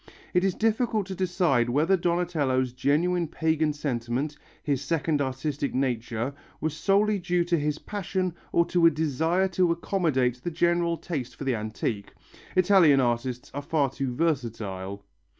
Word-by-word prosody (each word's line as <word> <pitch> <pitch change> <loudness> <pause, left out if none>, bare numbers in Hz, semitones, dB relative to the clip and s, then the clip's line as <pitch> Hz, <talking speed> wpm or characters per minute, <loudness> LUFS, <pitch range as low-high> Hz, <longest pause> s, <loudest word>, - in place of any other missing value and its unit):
It 180 0 +3
is 195 -2 +1
difficult 220 -1 +1
to 190 - -6
decide 175 -10 +1
whether 155 +9 +3
Donatello's 160 -8 0
genuine 165 +7 +1
pagan 160 0 +1
sentiment, 135 0 -2 0.3
his 140 -3 0
second 150 0 0
artistic 140 +2 -2
nature, 120 -1 -1 0.3
was 155 -1 -2
solely 200 +4 +2
due 175 -1 +1
to 170 -1 +1
his 150 0 -1
passion 185 -2 -3 0.2
or 170 - +3
to 170 -1 +4
a - - +8
desire 160 +4 +1
to 180 -1 +2
accommodate 150 -9 0
the 175 - -2
general 170 0 +1
taste 140 -9 -5
for - - -7
the 135 -2 +1
antique; 110 -1 -3 0.4
Italian 180 -6 +5
artists 120 0 -1
are 145 - -3
far 145 -2 0
too 135 -1 -3
versatile. 110 - -2
155 Hz, 150 wpm, -26 LUFS, 130-175 Hz, 0.4 s, a